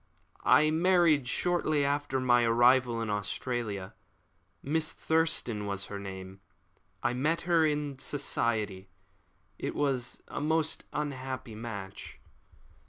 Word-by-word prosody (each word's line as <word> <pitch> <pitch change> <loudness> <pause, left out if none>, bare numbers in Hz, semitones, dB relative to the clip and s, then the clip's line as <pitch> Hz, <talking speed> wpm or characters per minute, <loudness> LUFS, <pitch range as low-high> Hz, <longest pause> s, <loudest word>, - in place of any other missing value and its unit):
"I 155 +1 +6
married 165 -5 +4
shortly 155 -1 +1
after 140 -1 0
my 120 -1 +4
arrival 120 0 +4
in 110 - -2
Australia. 105 -1 -3 0.7
Miss 155 +2 0
Thurston 160 -10 0
was 100 0 -2
her 100 - -4
name. 95 -1 -8 0.6
I 120 - +1
met 150 +7 0
her 165 -2 +3
in 145 -2 -2
society. 110 -9 -2 0.7
It - - -3
was 135 -4 -1
a - - -5
most 160 +1 +1
unhappy 130 -5 -4
match." 105 -4 -7
130 Hz, 110 wpm, -30 LUFS, 110-150 Hz, 0.7 s, I